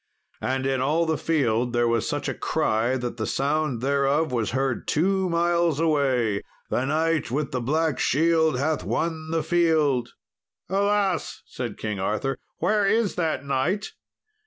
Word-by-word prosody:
And 130 0 -1
in 135 -1 0
all 155 +5 +2
the 160 -1 +1
field 125 -7 0
there 120 0 +2
was 115 -1 0
such - - -2
a - - -1
cry 115 +4 0
that 120 -2 -4
the 110 - -2
sound 140 -3 0
thereof 140 +3 +1
was 115 -4 0
heard 130 0 -1
two 190 +3 +1
miles 170 -2 +1
away 130 -10 +1 0.3
"The 125 - +1
knight 160 +2 0
with 140 +3 -2
the 125 - -2
black 155 +3 0
shield 160 -1 +2
hath 150 +3 0
won 160 -1 -2
the 165 0 0
field." 155 -8 +2 0.6
"Alas!" 200 -1 0
said 120 -5 -6
King 105 -2 -4
Arthur, 105 +8 -1 0.2
"where 210 -2 +2
is 220 0 +2
that 160 -5 -1
knight? 140 +10 -1
145 Hz, 155 wpm, -25 LUFS, 125-165 Hz, 0.6 s, all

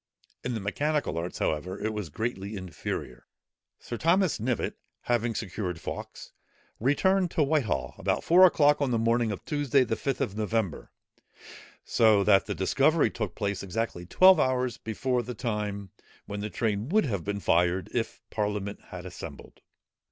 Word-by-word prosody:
In 125 -1 -2
the - - -2
mechanical 145 - -1
arts, 85 +2 -5
however, 90 +6 -2
it 110 +1 -2
was 105 -6 -4
greatly 105 +2 -4
inferior. 75 -9 -6 0.5
Sir 120 - -6
Thomas 175 +1 +2
Knivett, 120 +1 -1 0.3
having 120 -1 0
secured 90 -4 -4
Fawkes, - - -7 0.5
returned 180 - +2
to 160 - +1
Whitehall, 110 - 0
about - - 0
four 180 +3 +6
o'clock 150 -3 +3
on 140 - +2
the 120 - +1
morning 115 0 +2
of 100 - -6
Tuesday, 145 -2 +2
the 115 - -1
Fifth 135 +2 -2
of 100 - -2
November, 110 -5 -2 1.0
so 110 -3 +4
that 100 0 +4
the 105 - -2
discovery 140 - +3
took 105 -6 -4
place 100 -1 -2
exactly 95 -2 -3
twelve 185 - +6
hours 130 -3 +1
before 125 +3 -1
the 125 0 -6
time, 105 -5 -3 0.3
when 100 - -5
the 105 +1 -3
train 110 +2 -1
would 215 +2 +3
have 100 - -2
been 100 0 -3
fired, 90 0 +2
if 115 -2 -3
the - - -21
parliament 105 -1 -2
had 90 0 -8
assembled. 85 -5 -10
110 Hz, 160 wpm, -28 LUFS, 100-130 Hz, 1.0 s, four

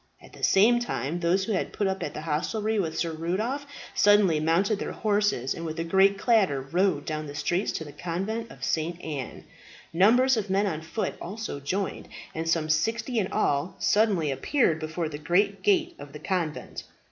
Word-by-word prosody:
At - - -17
the - - -13
same 230 +5 +5
time 165 - -3
those 180 +3 +2
who 225 - -3
had 190 - -1
put 205 - -1
up 190 0 -1
at - - -4
the - - -4
hostelry 210 +8 -1
with 160 -4 -2
Sir 165 0 -1
Rudolph 210 - -2 0.3
suddenly 205 -6 +4
mounted 180 +7 +1
their - - -4
horses, 205 - 0
and 165 - -7
with 160 -1 -5
a - - 0
great 195 +3 +4
clatter 200 - +3
rode 160 +3 0
down 155 -1 -3
the 145 - -8
streets 175 +7 0
to - - -3
the 145 - -9
Convent 195 +9 -4
of - - -12
St. 165 +2 -1
Anne. 145 -5 -6 0.5
Numbers 240 +8 +5
of 210 -2 -2
men 195 +2 +2
on 160 -6 -2
foot 165 +7 -3
also 205 -4 -5
joined, 185 +8 -3 0.3
and 165 +1 -3
some 165 -2 +1
sixty 225 +10 0
in 190 - -2
all 140 +5 0
suddenly 200 -8 +2
appeared 165 - +1
before 160 +1 -3
the 150 -1 -7
great 200 +6 +1
gate 355 -4 +2
of 140 - -10
the 150 - -8
convent. 170 -5 -3
180 Hz, 195 wpm, -27 LUFS, 155-210 Hz, 0.5 s, same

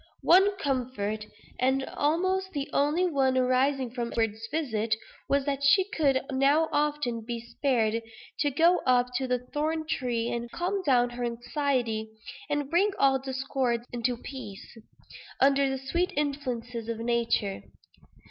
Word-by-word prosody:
One 390 +3 +5
comfort 240 - -2 0.3
(and 265 +1 +2
almost 375 +5 0
the 280 -2 -2
only 300 +6 +2
one 270 -6 +2
arising 255 0 +2
from 240 -1 -3
Edward's 225 -1 -1
visit) 225 -8 0 0.3
was, 280 -1 +2
that 280 -1 -2
she 375 +8 +4
could 280 -9 +2
now 280 +4 +3
often 290 -6 0
be 235 +1 -4
spared 230 -2 0 0.4
to 290 - +2
go 335 +6 +4
up 250 0 +3
to 260 0 -2
the 250 0 +1 0.2
thorn 315 +2 -1
tree, 240 -6 -1
and 235 0 -3
calm 370 +8 -2
down 245 -5 +3
her 245 0 -5
anxiety, 240 -2 -1 0.4
and 290 -1 -1
bring 390 +4 +3
all 270 -5 +4
discords 265 -2 -2
into 240 0 -1
peace, 235 -7 -9 0.6
under 275 0 +4
the 265 - -2
sweet 340 +7 -1
influences 250 -6 -3
of 230 - -2
nature. 230 -3 0
265 Hz, 140 wpm, -28 LUFS, 235-290 Hz, 0.6 s, One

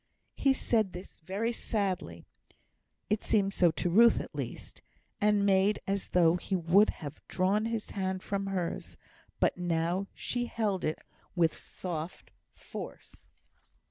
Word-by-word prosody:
He 275 -1 +3
said 220 -7 +1
this 180 +1 -10
very 195 +8 -2
sadly 190 - -2 0.9
(it 210 - +2
seemed 200 -2 +2
so 175 -3 +4
to 160 +2 -2
Ruth, 230 +5 +6
at - - -7
least), - - -6 0.4
and 210 -1 +3
made 195 +1 +3
as 195 0 -1
though 175 -1 +4
he 190 +2 -2
would 185 +4 +5 0.2
have 145 +1 -7
drawn 195 +4 +1
his 225 -2 -3
hand 190 -1 -2
from 195 -1 -2
hers, 185 -3 -3 0.4
but - - +2
now 175 +2 0
she 245 -1 -2
held 210 -6 -1
it 155 - 0 0.4
with 165 -2 +3
soft 170 -2 -6 0.2
force. - - -9
195 Hz, 140 wpm, -30 LUFS, 175-210 Hz, 0.9 s, Ruth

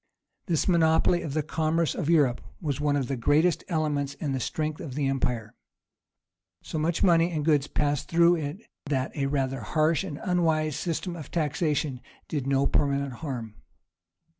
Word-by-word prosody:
This 165 -4 +1
monopoly 170 0 +3
of 145 -2 -5
the 155 - +1
commerce 160 +1 0
of 150 - -3
Europe 145 -7 +3 0.2
was 145 -4 -2
one 145 -1 +2
of 135 -3 0
the 135 - -1
greatest 150 +8 +2
elements 150 -5 -1
in 145 -2 -3
the 135 - -1
strength 155 +4 -3
of 135 -6 -7
the 145 -1 0
empire. 125 -5 -1 1.1
So 155 - -4
much 165 +2 0
money 170 -2 +4
and 155 -4 -2
goods 150 -3 +3
passed 145 -2 -1
through 170 +1 +5
it 155 +6 -5 0.3
that 135 -2 -1
a 140 -2 0
rather 135 -2 -1
harsh 155 - +1
and 150 -7 -6
unwise 160 -4 +1
system 175 +1 -3
of 155 -5 -8
taxation 150 -4 -1 0.3
did 140 -4 -3
no 135 0 +2
permanent 140 -2 +1
harm. 120 -8 -5
150 Hz, 165 wpm, -27 LUFS, 140-165 Hz, 1.1 s, through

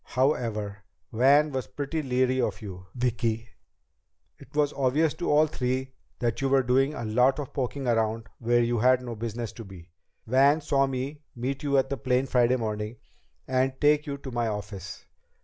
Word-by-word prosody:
"However, 115 -7 -1 0.3
Van 140 +6 +5
was 130 -2 -3
pretty 145 +3 -3
leery 130 -1 +1
of - - -1
you, 95 -2 -8
Vicki. 115 -2 -1 0.9
It 140 - -16
was 150 -1 +2
obvious 140 +4 +2
to 175 - -3
all 150 +1 +5
three 130 -2 -2 0.2
that 120 0 -1
you 135 - +1
were 135 -1 +4
doing 135 +4 +2
a 120 - -4
lot 125 +5 +3
of 145 -3 -6
poking 135 0 -3
around 115 -1 0
where 120 0 +3
you 120 0 0
had 125 +2 +4
no 120 -1 -5
business 115 0 -4
to 115 - -9
be. 95 -4 -13 0.3
Van 135 +6 +4
saw 140 -2 +2
me 135 +3 -4
meet 130 +4 -3
you 140 -2 +1
at 135 +1 +1
the 140 - -1
plane 125 +2 +1
Friday 125 -1 +3
morning 110 -1 -3 0.5
and 130 0 0
take 150 +1 +3
you 140 -1 -3
to 135 -1 -8
my 120 -1 0
office. 105 -3 -6
125 Hz, 180 wpm, -27 LUFS, 115-135 Hz, 0.9 s, Van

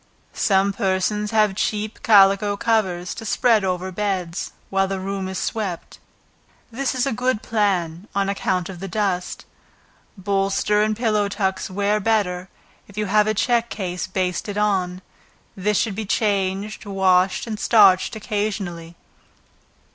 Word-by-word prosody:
Some 195 -1 +2
persons 195 +2 0
have 215 -2 +3
cheap 210 +1 -2
calico 200 -1 +5
covers, 190 -6 0
to 230 - -8
spread 225 0 +2
over 185 0 -2
beds, 185 -3 -3 0.2
while 195 0 +2
the 195 0 -3
room 195 0 -3
is 190 0 -5
swept, 200 -6 -4 0.7
this 265 +3 -2
is 250 - +1
a 275 - 0
good 250 -1 -1
plan, 190 -4 -1
on 200 -1 +1
account 185 -2 -1
of 185 -3 -8
the 195 - -5
dust. 190 -2 -2 0.7
Bolster 195 +2 +1
and 215 0 0
pillow 215 -3 +1
tucks 190 -2 -2
wear 205 +2 0
better, 190 -4 0 0.4
if 200 - -16
you 210 - 0
have 210 +2 +3
a 215 - +1
check 235 +2 +1
case 180 -4 -4
basted 185 +2 -2
on, 190 -3 0 0.5
this 205 +1 0
should 220 - 0
be 215 +2 -4
changed, 200 0 -1
washed 190 -1 +2
and 220 -2 -5
starched 200 -2 +5
occasionally. 200 -6 -4
200 Hz, 140 wpm, -22 LUFS, 190-215 Hz, 0.7 s, calico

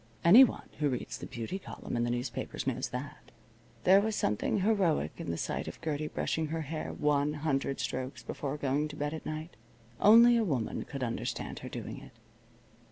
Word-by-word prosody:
Anyone 230 +8 +7
who 150 -1 +2
reads 125 - -4
the - - -7
beauty 120 +12 -5
column - - -7
in 120 - +1
the 120 - 0
newspapers 120 0 -3
knows - - -1
that. - - -7 0.5
There 190 +2 +7
was 220 0 -1
something 105 - 0
heroic 185 - +2
in - - -6
the 85 - -2
sight - - -3
of - - -7
Gertie 155 -2 -2
brushing 160 +1 -1
her 160 +1 -3
hair 155 +1 -4
one 150 0 +1
hundred 140 -2 -1
strokes 130 -1 -4
before 140 +4 -4
going 145 +1 0
to 150 - -9
bed 145 +1 -2
at 160 - -6
night. 155 +2 -5 0.4
Only 235 +3 +8
a 230 - +2
woman 135 - -2
could 135 -2 -5
understand 115 -2 -3
her - - -7
doing - - -6
it. - - -14
150 Hz, 185 wpm, -31 LUFS, 130-170 Hz, 0.5 s, Only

